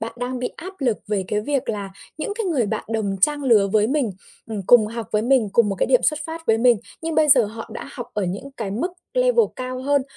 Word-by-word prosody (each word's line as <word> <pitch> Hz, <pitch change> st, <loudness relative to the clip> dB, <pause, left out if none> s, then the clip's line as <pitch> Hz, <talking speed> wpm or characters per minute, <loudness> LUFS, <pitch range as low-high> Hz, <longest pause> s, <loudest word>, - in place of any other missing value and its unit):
bạn 225 Hz, -, -4 dB
đang 250 Hz, +1 st, -3 dB
bị 250 Hz, -, -2 dB
áp 375 Hz, +3 st, -8 dB
lực 240 Hz, -5 st, +1 dB
về 200 Hz, -3 st, 0 dB
cái 210 Hz, -, 0 dB
việc 275 Hz, +3 st, -2 dB
là 200 Hz, -3 st, -3 dB, 0.3 s
những 360 Hz, -, -3 dB
cái 455 Hz, -, -3 dB
người 285 Hz, -, +1 dB
bạn -, -, -3 dB
đồng 215 Hz, -3 st, -1 dB
trang 290 Hz, +7 st, +2 dB
lứa 220 Hz, -6 st, +4 dB
với 215 Hz, 0 st, +4 dB
mình, 270 Hz, -4 st, 0 dB, 0.4 s
ừm, 215 Hz, -3 st, -4 dB
cùng 230 Hz, -3 st, +7 dB
học 230 Hz, +1 st, -5 dB
với 210 Hz, 0 st, +2 dB
mình, 245 Hz, -4 st, +3 dB
cùng 230 Hz, -3 st, +4 dB
một 195 Hz, -, -1 dB
cái -, -, +1 dB
điểm -, -, +3 dB
xuất 305 Hz, -1 st, +2 dB
phát 325 Hz, 0 st, -7 dB
với 225 Hz, 0 st, +3 dB
mình, 245 Hz, 0 st, +5 dB, 0.3 s
nhưng 325 Hz, -1 st, -2 dB
bây 305 Hz, -1 st, +3 dB
giờ 260 Hz, -4 st, +7 dB
họ 225 Hz, +2 st, -8 dB
đã -, -, -7 dB
học 245 Hz, -3 st, -6 dB
ở 205 Hz, -2 st, 0 dB
những 200 Hz, +10 st, -5 dB
cái 210 Hz, -4 st, -4 dB
mức 270 Hz, -, -2 dB, 0.2 s
level -, -, +4 dB
cao 255 Hz, 0 st, -5 dB
hơn, 280 Hz, 0 st, +2 dB
245 Hz, 260 wpm, -22 LUFS, 215-290 Hz, 0.4 s, cùng